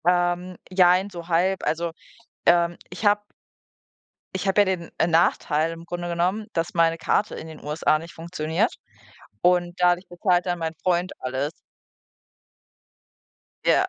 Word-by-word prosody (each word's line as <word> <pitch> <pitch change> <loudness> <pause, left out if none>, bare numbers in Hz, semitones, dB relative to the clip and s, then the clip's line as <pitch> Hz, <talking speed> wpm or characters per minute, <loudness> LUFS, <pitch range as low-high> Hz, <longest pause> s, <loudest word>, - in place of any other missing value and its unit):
Ähm, 175 0 +1
jein, 185 +1 +4
so 170 -3 -9
halb. 180 +3 +1
Also, 165 +1 0 0.6
ähm, 170 0 +4
ich 180 +5 -7
habe 205 0 +4 1.1
Ich 190 +1 -2
habe 195 +2 +4
ja - - +4
den 185 -3 -2 0.2
Nachteil 165 -2 +2
im 165 0 -10
Grunde 175 +1 -5
genommen, 180 +5 0
dass 165 0 -1
meine 165 -1 +3
Karte 205 +5 0
in 160 - -7
den 160 -1 -11
USA 155 +1 +1
nicht 165 +2 -10
funktioniert 165 +5 -1 0.7
und 175 -1 +3
dadurch 180 +1 +3
bezahlt 175 0 +1
dann 175 -1 -1
mein 165 -1 -3
Freund 180 0 +1
alles. 130 +3 -2 2.1
Ja, - - +4
175 Hz, 140 wpm, -24 LUFS, 165-185 Hz, 2.1 s, jein